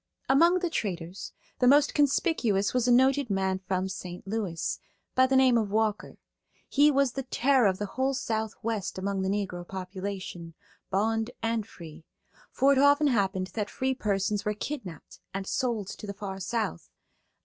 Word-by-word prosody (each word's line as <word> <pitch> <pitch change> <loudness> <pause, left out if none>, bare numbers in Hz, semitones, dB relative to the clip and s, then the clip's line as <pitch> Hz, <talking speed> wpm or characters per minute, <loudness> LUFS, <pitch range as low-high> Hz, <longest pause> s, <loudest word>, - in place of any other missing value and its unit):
Among 335 +7 +5
the 355 -1 -1
traders 180 - -4 0.3
the 250 - +4
most 285 +2 +5
conspicuous 270 - +2
was 250 -1 +1
a - - +4
noted 265 +1 +4
man 190 -1 0
from 190 0 -2
St. 180 -2 -7
Louis, 195 -5 -3 0.3
by 260 0 +4
the 265 - +1
name 260 -3 +5
of 215 -2 -2
Walker. 215 0 -1 0.5
He 290 +2 +4
was 275 -3 +2
the 270 - -4
terror 260 -2 +2
of 190 -1 +1
the 205 - -3
whole 265 +6 -1
Southwest 220 -4 -3
among 195 0 -2
the 190 - -1
Negro 195 -3 -2
population, 185 -2 -6 0.3
bond 220 +4 0
and 225 -2 -1
free; 160 -2 -12 0.5
for 270 +2 +3
it 275 - +3
often 285 +2 +5
happened 195 -5 0
that 210 -2 -2
free 265 0 -1
persons 205 -3 -1
were 210 0 -1
kidnapped 205 - -7 0.2
and 195 0 -3
sold 235 -3 -1
to 210 - -8
the 200 - -5
far 195 -1 -6
South. 220 - -3
215 Hz, 165 wpm, -28 LUFS, 190-260 Hz, 0.5 s, Among